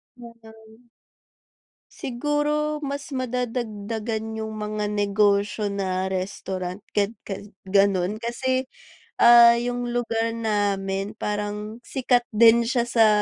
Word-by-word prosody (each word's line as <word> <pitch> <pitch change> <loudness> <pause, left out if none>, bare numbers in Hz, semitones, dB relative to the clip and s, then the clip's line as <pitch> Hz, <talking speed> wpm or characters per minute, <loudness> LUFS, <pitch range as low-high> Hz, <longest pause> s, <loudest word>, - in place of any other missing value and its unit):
Mm. 230 -1 -16 1.0
Siguro, 295 +3 -1
mas 280 0 -5
madadagdagan 225 -3 -3
yung 220 0 -6
mga 210 0 -3
negosyo 205 0 +1
na 190 -1 -2
restaurant, 185 0 -4
gan 205 +2 0
ga 195 -1 -5 0.2
gano'n. 195 +1 +2
Kasi, 255 +3 -1 0.5
ah, 235 0 +8
yung 245 +1 -2
lugar 230 -1 -1
namin 205 -2 -1
parang 210 +1 -4
sikat 245 -2 +1
din 230 +1 +6
siya 245 -1 +1
sa, 225 -2 +4
220 Hz, 100 wpm, -24 LUFS, 205-240 Hz, 1.0 s, ah